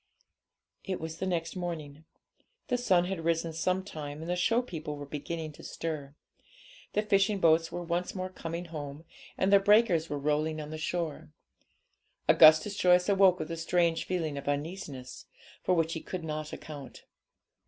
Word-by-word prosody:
It 190 -2 -3
was 160 +1 -6
the 190 - -2
next 170 -1 -2
morning. 160 -4 -5 0.6
The 250 - +2
sun 180 -7 +3
had 180 -3 -3
risen 165 0 0
some 185 +3 0
time, 150 -5 -7
and 165 - -6
the 175 - 0
show 225 +8 +2
people 155 -9 -6
were 145 0 -7
beginning 155 +2 -5
to 150 - -14
stir; 150 -4 -5 0.8
the 210 - +1
fishing 200 -1 +2
boats 165 -1 +4
were 175 - -4
once 175 +2 -2
more 185 0 -3
coming 170 -1 -5
home, 145 +1 -6 0.3
and 195 +1 +2
the 200 - +9
breakers 195 -5 +4
were 145 - -2
rolling 150 +2 0
on 150 0 -6
the 155 - -5
shore. 160 -2 -3 1.0
Augustus 155 +6 +7
Joyce 180 -1 +4
awoke 195 -2 +5
with 155 0 -5
a 165 - -3
strange 165 0 +1
feeling 160 -6 -2
of 140 - -11
uneasiness, 145 -3 -4 0.3
for 185 - +2
which 165 -1 +1
he 160 - -4
could 185 -3 -5
not 155 -1 -4
account. 145 -4 -9
165 Hz, 170 wpm, -30 LUFS, 155-185 Hz, 1.0 s, the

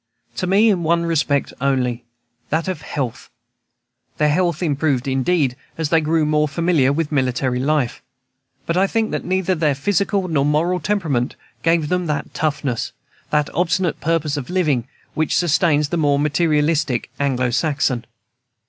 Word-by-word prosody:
To 185 - -1
me 205 +4 +5
in 185 -4 0
one 170 +1 +1
respect 150 -4 0
only, 125 -3 0 0.4
that 160 +3 0
of 185 -5 -3
health. 130 -6 -4 0.9
Their 150 0 +3
health 175 +1 0
improved, 140 -4 0
indeed, 135 0 +1 0.2
as 160 -2 -1
they 165 0 +4
grew 155 0 +1
more 150 0 +2
familiar 155 -3 +2
with 155 +1 -1
military 130 -2 0
life; 140 -2 0 0.6
but 170 - -1
I 190 +2 +3
think 225 +1 0
that - - -2
neither 185 0 +1
their 155 -4 +1
physical 200 +5 0
nor 155 -5 +1
moral 160 +5 +1
temperament 160 -10 -1 0.3
gave 165 -2 +2
them 180 -1 0
that 150 -2 -3
toughness, 145 -6 -2 0.4
that 150 -1 0
obstinate 175 0 0
purpose 155 -2 0
of 135 - -5
living, 150 -10 +1 0.3
which 155 -1 0
sustains 155 -3 +2
the 170 - -1
more 145 -3 +2
materialistic 150 -3 +1
Anglo 130 -3 0
Saxon. 130 -3 0
150 Hz, 150 wpm, -20 LUFS, 140-170 Hz, 0.9 s, me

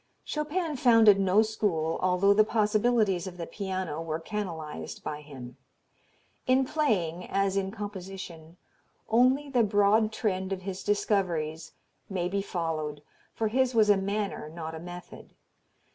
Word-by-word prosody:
Chopin 305 0 -2
founded 225 -5 +6
no 195 +3 +4
school, 180 -7 -1
although 185 +2 +4
the 215 +1 +5
possibilities 215 -3 +1
of 180 -1 -8
the 170 - -4
piano 185 -6 -4
were 160 -1 -3
canalized 160 - -5
by 150 0 -5
him. 135 -4 -10 0.9
In 260 +1 +4
playing, 185 - 0
as 195 0 +1
in 195 -1 0
composition, 190 -5 -8 0.5
only 255 +5 +3
the 255 -3 +2
broad 210 +1 +3
trend 190 -4 -2
of 190 -1 -3
his 190 0 -5
discoveries 175 -7 -1 0.4
may 180 -3 -1
be 200 +2 -1
followed, 155 -6 -3 0.3
for 220 -1 0
his 255 +1 +1
was 215 -2 +5
a - - +6
manner 200 -4 -2
not 160 0 -6
a 160 - -6
method. 175 +1 -10
195 Hz, 140 wpm, -28 LUFS, 170-215 Hz, 0.9 s, founded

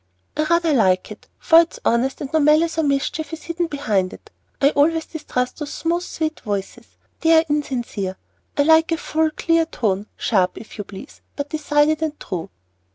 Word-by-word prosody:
"I 305 - +1
rather 335 0 +2
like 190 -7 +2
it, - - -11
for 330 - +6
it 335 0 +2
is - - -10
honest, 240 +3 +1
and 280 0 -6
no 315 - +4
malice 310 +2 +3
or - - +2
mischief 285 +2 -1
is 325 - -7
hidden 340 0 -2
behind 210 - -1
it. - - -14 0.3
I 280 +1 +4
always 320 +3 +2
distrust 250 -5 -3
those 295 -1 -5
smooth, 340 +1 -1
sweet 315 -3 -3
voices; 205 +3 -5 0.3
they 330 0 +4
are 320 - +4
insincere. 240 -10 -2 0.4
I 285 - +4
like 320 +2 +5
a 330 - +2
full, 315 0 0
clear 330 +1 +1
tone; 205 -7 -1
sharp, 190 -5 +1
if 220 0 -11
you 205 - -4
please, 195 +9 -11
but 285 0 -5
decided 305 0 +2
and 310 -1 -2
true." 180 -4 -5
295 Hz, 190 wpm, -21 LUFS, 235-320 Hz, 0.4 s, for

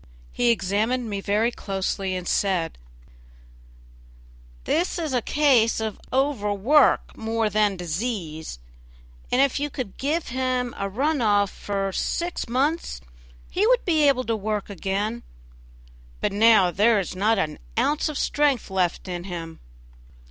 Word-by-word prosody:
He 245 - +1
examined 220 +4 0
me 200 -1 -3
very 210 +4 +1
closely 195 -2 -3
and 180 -1 -5
said: 180 - 0 1.8
"This 345 +4 0
is 315 -5 -3
a 250 - +2
case 255 -6 +3
of 220 -2 -4
overwork 260 0 +2
more 225 -1 -1
than 210 -1 +2
disease, 170 - -4 0.7
and 250 - +2
if 275 0 +2
you 295 +1 -1
could 255 -8 -6
give 305 +5 -1
him 255 -1 -1
a 200 - -3
run 280 +7 0
off 205 -3 +3
for 195 -1 -3
six 345 - -2
months 285 - 0 0.5
he 405 +4 +2
would - - +3
be 315 -4 +3
able 260 -2 +3
to 230 -2 -1
work 210 -1 -3
again; 200 +5 -2 1.0
but - - 0
now 210 -3 +5
there 215 +3 +3
is 185 -1 -4
not 215 +4 +2
an 155 -6 -2 0.2
ounce 290 +6 +1
of 300 - -4
strength 285 -8 +1
left 185 -1 0
in 175 -1 -5
him." 165 -3 -7
220 Hz, 140 wpm, -24 LUFS, 195-265 Hz, 1.8 s, now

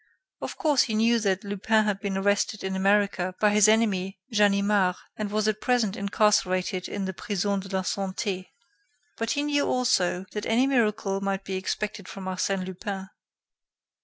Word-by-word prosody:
Of - - -5
course, 295 -5 +3
he 220 - 0
knew 230 +2 +3
that 195 -3 0
Lupin 205 +2 +1
had 205 -2 -1
been 195 -1 -3
arrested 200 +2 0
in 190 0 -2
America 195 -2 +1
by 210 -1 +4
his 210 0 +5
enemy 200 -3 +1
Ganimard 200 -2 +3 0.2
and 215 -1 -3
was 215 +1 0
at 215 0 -1
present 240 -6 +1
incarcerated 190 -2 +1
in 200 -1 -3
the 190 - -3
Prison 200 +1 -1
de 195 - -8
la 190 -1 -1
Santé. 190 0 -3 0.7
But 230 0 -2
he 285 - -1
knew 290 -1 +1
also 190 -8 +1
that 210 0 -4
any 235 +4 +3
miracle 215 -6 +1
might 195 0 -2
be 190 - -3
expected 200 +1 -3
from 195 -1 -8
Arsène 185 0 -1
Lupin. 190 +1 -6
200 Hz, 165 wpm, -26 LUFS, 190-215 Hz, 0.7 s, his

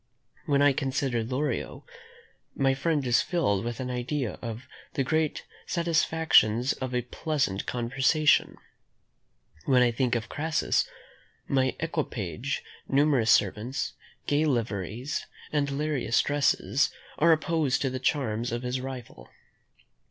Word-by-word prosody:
When 140 -1 +3
I 145 -1 +5
consider 130 -3 -1
Lorio, 130 +6 -3 0.7
my 135 -1 +2
mind 155 -5 +1
is 120 0 +4
filled 105 - 0
with 120 -1 -4
an 125 -1 -3
idea 125 0 -3
of 115 +2 -6 0.3
the 135 - +1
great 155 +3 0 0.2
satisfactions 160 - +3
of 130 -1 -4
a 125 - 0
pleasant 130 - -2
conversation. 135 +5 +2 1.1
When 125 -2 +5
I 120 - +3
think 120 0 0
of 110 -1 -2
Crassus, 155 +1 0 0.6
my 130 -1 +1
equipage, 135 - -3 0.2
numerous 135 -5 +3
servants, 110 +6 +1 0.3
gay 145 +2 +2
liveries, 115 - -2 0.3
and 145 -2 +1
various 140 -3 0
dresses, 145 -1 +2 0.3
are 165 +3 +6
opposed 155 -4 +1
to 135 - 0
the 130 - -3
charms 120 -5 0
of 120 +1 -3
his 125 +1 -2
rival. 125 - -8
130 Hz, 120 wpm, -27 LUFS, 120-145 Hz, 1.1 s, are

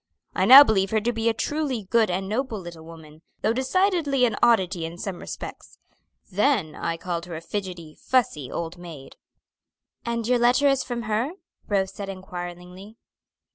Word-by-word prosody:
I - - +1
now 270 +3 +11
believe 195 -6 +1
her 220 - +1
to 240 +3 -1
be 225 0 0
a - - +1
truly 275 -1 -2
good 220 +2 +2
and 190 +2 -2
noble 225 +1 -2
little 170 -3 -10
woman, 160 -1 -13 0.2
though 220 - +2
decidedly 285 - +1
an 225 -3 0
oddity 190 -7 +3
in 165 +1 -6
some 190 -2 -5
respects. - - -9 0.5
Then 205 - +1
I 165 - -3
called 170 0 -4
her 170 - -6
a - - -5
fidgety, 175 -4 -6
fussy 190 - 0
old 170 +1 -5
maid." 160 -6 -11 0.9
"And 235 -1 -2
your 250 0 +3
letter 245 +4 +4
is 275 -1 +2
from 240 -2 -4
her?" 220 +8 -1 0.3
Rose 195 -2 0
said 200 -1 -6
inquiringly. 180 +2 -8
200 Hz, 170 wpm, -24 LUFS, 175-240 Hz, 0.9 s, now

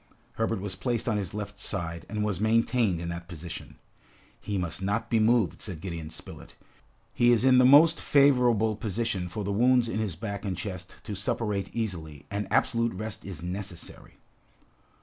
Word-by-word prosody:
Herbert 115 -2 -1
was 100 -2 -4
placed 120 0 -1
on 110 -3 +1
his 100 -4 -3
left 100 -1 -6
side, 85 -2 -3
and 105 -1 -2
was 105 -3 -1
maintained 115 -3 +2
in 85 0 -4
that 85 0 -6
position. 85 -1 -8 0.6
"He 100 - -3
must 90 0 -2
not 100 +2 -1
be 115 - +4
moved." 110 -6 +2
said 95 -7 -5
Gideon 85 -3 -5
Spilett. 80 - -11 0.6
"He 120 0 +4
is 120 +1 +3
in 130 -1 +6
the 125 - +6
most 155 +5 +7
favorable 125 -6 +4
position 100 -3 -2
for 105 +3 -4
the 100 +1 -2
wounds 125 +2 +4
in 110 -1 -2
his 105 -6 -2
back 100 +2 -5
and 95 -4 -3
chest 90 -1 -6
to 105 - -5
suppurate 100 0 -2
easily, 80 -10 -4
and 100 +1 -2
absolute 115 -4 +2
rest 110 +2 -5
is 90 -4 -7
necessary." 90 -1 -7
105 Hz, 175 wpm, -28 LUFS, 90-115 Hz, 0.6 s, most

